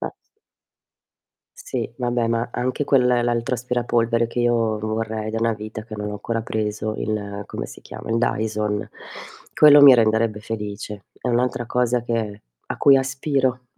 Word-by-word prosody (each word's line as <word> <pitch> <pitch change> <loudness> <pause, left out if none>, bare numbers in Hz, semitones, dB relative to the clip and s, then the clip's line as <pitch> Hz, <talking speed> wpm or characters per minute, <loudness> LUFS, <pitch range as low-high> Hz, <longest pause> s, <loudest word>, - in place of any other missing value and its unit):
A - - -4 1.5
Sì, - - -4
vabbè, 120 -2 -1
ma 115 +1 -1
anche 130 +4 -2
quel 135 -3 +3
l'altro 120 0 +1
aspirapolvere 120 -1 0
che 120 - -4
io 115 -2 +1
vorrei 110 0 -3
da 115 - -2
una 115 0 +1
vita, 110 +1 -7
che 110 -1 -9
non 105 0 -4
ho - - -5
ancora 115 +2 -3
preso, 110 -1 -3
il 100 -1 -3
come - - -5
si - - -12
chiama? - - -10
Il 115 - +1
Dyson. 105 -2 -1 0.7
Quello 145 -1 +8
mi 140 -2 +10
renderebbe 110 -1 +2
felice. 105 -2 -6
È - - -5
un'altra 120 0 0
cosa 125 0 +1
che 110 -3 -3 0.2
a - - -4
cui 140 -1 +6
aspiro. 135 -2 -1
115 Hz, 155 wpm, -22 LUFS, 110-125 Hz, 1.5 s, mi